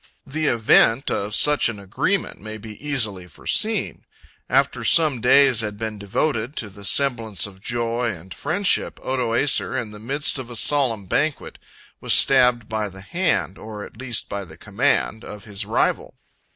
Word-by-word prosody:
The 155 +2 -2
event 115 +2 +3
of 105 +1 -1
such 150 -4 +4
an 115 - -6
agreement 100 - -2
may 110 +1 -7
be 110 0 -10
easily 110 -11 -2
foreseen. 220 - -2 0.5
After - - +1
some 155 -7 +3
days 130 -1 +5
had 105 -1 -4
been 110 -1 -5
devoted 115 +5 -2
to 105 -3 -3
the 100 +1 -13
semblance 115 -4 +1
of 95 -2 -12
joy 120 +1 -1
and 95 -2 -8
friendship, 185 +7 0
Odoacer, 130 +1 +1
in 110 -3 -6
the 105 - -11
midst 140 +5 0
of 125 -2 -7
a 120 - -7
solemn 120 -5 +2
banquet, 145 +10 -2 0.4
was - - +4
stabbed 125 -4 +4
by 110 -1 -2
the 95 0 -11
hand, 170 - -1
or 105 -1 -8
at - - -15
least 120 -1 -2
by 100 0 -5
the 80 -3 -13
command, 110 +2 0
of 105 -1 -9
his 100 -3 -5
rival. - - -1
115 Hz, 165 wpm, -22 LUFS, 105-135 Hz, 0.5 s, days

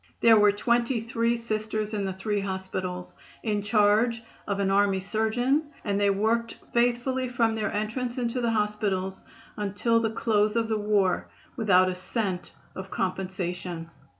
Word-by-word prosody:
There 230 -1 +7
were 205 0 +6
twenty 235 +3 +1
three 230 +1 0
Sisters 215 -1 -3
in 205 -2 -1
the 190 - -2
three 205 +2 -2
hospitals, 190 -2 -4 0.3
in 210 -2 0
charge 215 +2 +3 0.2
of 200 -1 -1
an 195 -1 +1
army 195 -1 +3
surgeon, 230 +9 +1 0.2
and 200 -1 0
they 205 0 +3
worked 225 +4 0 0.2
faithfully 245 +2 +1
from 230 -2 +1
their 220 -1 -1
entrance 235 +4 -2
into 245 0 -1
the 235 - +1
hospitals 210 -3 -1 0.4
until 210 +3 +1
the 225 -1 0
close 215 -1 +1
of 230 -1 +1
the 220 -1 0
war, 205 -3 +1 0.3
without 190 -6 +4
a 185 - 0
cent 185 -1 -3 0.2
of 190 0 -7
compensation. 180 -3 -3
210 Hz, 150 wpm, -27 LUFS, 195-230 Hz, 0.4 s, There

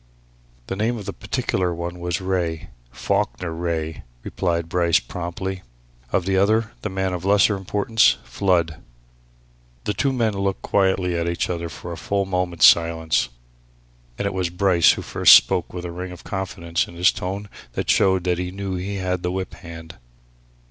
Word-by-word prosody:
"The 95 - -4
name 115 +4 0
of 105 - -7
the - - -4
particular 90 -2 -1
one 85 +1 -5
was 85 -1 -2
Wraye 90 -4 -2 0.2
Falkiner 90 - -1
Wraye," 80 -2 -3 0.2
replied 85 -2 -1
Bryce 85 -1 +3
promptly. 90 +7 -5 0.5
"Of 90 - +1
the 95 0 +1
other 110 +3 +2
the - - -3
man 95 0 -1
of 90 -1 -4
lesser 100 +2 +4
importance 100 +3 +2
Flood." 85 -5 0 1.0
The 105 - -1
two 135 +8 +1
men 115 -4 +1
looked 100 -1 -2
quietly 95 -2 +1
at 85 0 0
each 85 +1 -1
other 85 -1 -3
for 80 +3 -8
a 85 - -6
full 100 +1 -1
moment's 90 -2 +2
silence. 80 -3 +4 0.9
And - - -2
it 100 - -1
was 95 -2 -1
Bryce 90 -1 +4
who - - -6
first - - +7
spoke - - +3
with 90 0 -6
a 85 - -4
ring 90 +1 -6
of 90 - -11
confidence 85 -3 -2
in 85 - -12
his 90 +1 +4
tone 100 +3 -5 0.3
which - - +1
showed 95 -2 +3
that 90 -1 0
he 90 0 -2
knew 95 +1 -5
he 100 +3 -4
had 90 -2 -2
the 90 - -2
whip 95 0 -4
hand. 85 -2 -10
90 Hz, 175 wpm, -22 LUFS, 85-95 Hz, 1.0 s, first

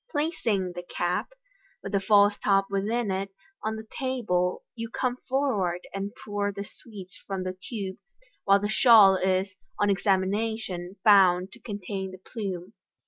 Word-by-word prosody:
Placing 235 - -1
the 175 0 -6
cap, 175 0 -2 0.5
with - - -5
the 200 - +2
false 205 +1 +5
top 195 -1 +3
within 210 +2 0
it, 195 +1 -2 0.3
on 220 0 -2
the 220 0 -8
table, 215 -9 0
you 230 -1 -6
come 250 +1 -1
forward 210 -11 0
and 195 +1 -3
pour 205 -1 -1
the 200 0 -5
sweets 200 -3 -12
from 195 -2 -3
the 185 0 -4
tube, 195 -5 -4 0.5
while 200 0 +5
the 205 - -1
shawl 215 -3 +7
is 190 +1 0 0.2
on 205 0 +2
examination 195 -1 -1
found 190 -3 +5
to 235 - -14
contain 200 -3 -5
the 185 - -10
plume. 190 -2 -6
200 Hz, 150 wpm, -27 LUFS, 185-220 Hz, 0.5 s, shawl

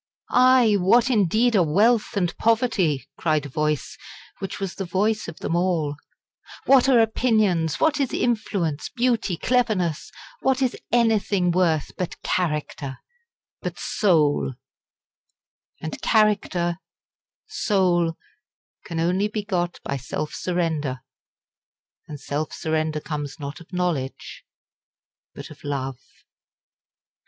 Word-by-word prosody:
"Aye! 250 -4 +5
what, 235 +7 +4
indeed, 220 +2 +3
are 195 - +5
wealth 210 +8 +2
and 175 -3 0
poverty?" 220 - +1
cried 155 -3 +1
a - - -6
voice, 150 +1 -2 0.4
which 195 - -5
was 195 -2 -3
the 195 - -4
voice 205 +5 0
of 170 - -8
them 165 - -2
all; 170 -5 0 0.7
"what 270 -1 +5
are 255 - +6
opinions 215 -8 +2
what 310 -2 +2
is 275 -3 0
influence, 195 -10 -1
beauty, 235 -7 0
cleverness? 205 - 0 0.3
what 265 0 +1
is 260 -2 0 0.2
anything 215 -6 +2
worth 170 -4 +1
but 180 - -4
character 150 -5 -2 0.6
but - - -5
soul?" 155 - +1 1.2
And 160 - -6
character 185 -5 +2 0.7
soul 180 - +1 0.7
can 165 -1 -5
only 180 +5 +1
be 210 0 -4
got 175 -4 -2
by 140 - -3
self 140 +4 -4
surrender; 160 -7 -2 1.1
and 150 -2 -8
self 145 +3 -3
surrender 155 -1 -1
comes 145 -1 -5
not 140 0 -6
of 170 - -16
knowledge 175 -8 -3 0.9
but - - -9
of - - -14
love. 135 -3 -3
180 Hz, 115 wpm, -23 LUFS, 155-220 Hz, 1.2 s, are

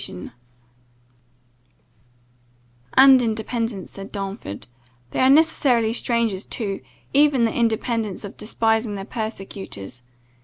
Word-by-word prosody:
[Godwin's 90 0 -6
note] - - -10 2.7
"And 265 -1 +8
independence," 225 -2 -2
said 195 +1 -9
Darnford, 195 - -6 0.5
"they - - -3
are 260 - +5
necessarily 270 -7 +4
strangers 230 -5 0
to, 200 -4 -4 0.3
even 280 -4 +4
the 225 - 0
independence 225 -3 -1
of 200 - -8
despising 225 0 0
their 195 -1 -6
persecutors. 195 - -6
225 Hz, 105 wpm, -22 LUFS, 195-240 Hz, 2.7 s, And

